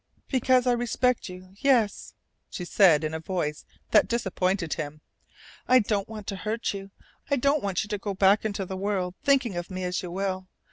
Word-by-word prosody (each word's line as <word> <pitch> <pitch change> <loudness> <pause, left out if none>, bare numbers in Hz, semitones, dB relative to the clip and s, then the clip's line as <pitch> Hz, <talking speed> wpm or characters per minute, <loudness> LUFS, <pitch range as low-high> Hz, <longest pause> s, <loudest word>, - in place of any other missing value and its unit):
"Because 255 -1 +3
I 250 - +4
respect 245 -1 0
you, 185 +1 -11
yes," 245 -7 +1 0.3
she 180 - -6
said 175 -5 +5
in 155 0 -2
a 160 - -3
voice 160 -3 -3 0.3
that 215 - +5
disappointed 190 -6 0
him. 150 -1 -5 0.7
"I 255 - +6
don't 205 -4 0
want 215 -2 -8
to 195 - -4
hurt 220 +4 -2
you. 195 0 -7 0.4
I 280 - +3
don't 280 +2 +2
want 195 0 -1
you - - -8
to 210 -1 -2
go 200 0 -4
back 195 +2 +4
into 200 -3 -2
the 190 - -5
world 190 -2 -1
thinking 265 -8 +2
of 175 +1 -4
me 185 -1 -5
as 180 0 -1
you 180 - -6
will. 185 0 -3
195 Hz, 195 wpm, -26 LUFS, 180-230 Hz, 0.7 s, I